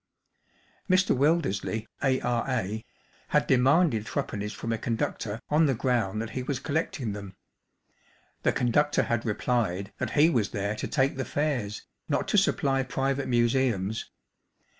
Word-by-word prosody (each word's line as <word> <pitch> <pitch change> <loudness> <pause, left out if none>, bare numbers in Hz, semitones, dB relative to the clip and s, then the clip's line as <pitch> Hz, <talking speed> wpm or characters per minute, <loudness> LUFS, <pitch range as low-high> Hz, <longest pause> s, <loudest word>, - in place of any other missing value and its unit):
Mr. 185 -1 +4
Wildersley, 125 - +1 0.2
A.R.A., 120 -5 0 0.4
had - - +2
demanded 130 - +3
three - - -1
pennies 105 0 -5
from 115 +2 -3
a - - -1
conductor 110 -2 -2
on 155 +1 +4
the 135 - +1
ground 115 -5 0
that 115 - -7
he 130 - -3
was 130 0 -2
collecting 140 -6 -2
them. 100 -2 -8 1.1
The - - +3
conductor 145 +5 +2
had 120 -1 -1
replied 105 -3 -1
that - - -2
he 150 +2 +7
was 115 -8 +1
there 100 +1 -2
to - - -3
take 135 -2 +1
the 135 - -1
fares', 130 -9 -2 0.2
not - - 0
to - - +3
supply 135 -1 +1
private 135 +1 -1
museums. 120 -4 +1
120 Hz, 140 wpm, -27 LUFS, 110-135 Hz, 1.1 s, he